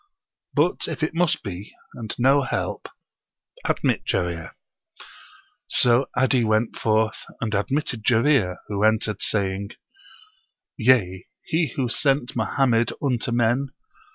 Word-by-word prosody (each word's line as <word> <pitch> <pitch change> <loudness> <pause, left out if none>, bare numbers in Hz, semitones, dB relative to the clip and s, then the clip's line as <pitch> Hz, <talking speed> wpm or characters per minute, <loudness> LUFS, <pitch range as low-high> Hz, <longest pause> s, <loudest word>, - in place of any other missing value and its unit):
"' - - -65
But - - +2
if - - -4
it 155 - 0
must 170 -1 +1
be, 95 0 -7 0.2
and 110 -3 -6
no 135 +3 +4
help, 130 - -3 0.8
admit - - 0
Jarir." 85 -2 -2 1.1
So 125 +2 +3
'Adi 130 -1 +3
went 110 +1 +1
forth 110 0 0 0.2
and 110 -2 -3
admitted 115 +3 -1
Jarir, 115 -6 +3
who 105 0 -2
entered 110 -1 +1
saying: 100 0 -1 1.0
'Yea, 110 -7 +2 0.2
He 160 -5 -1
who 130 -3 0
sent 135 +1 0
Mohammed 120 +1 +1
unto 125 -3 -1
men. 120 +3 +1
120 Hz, 120 wpm, -23 LUFS, 105-135 Hz, 1.1 s, no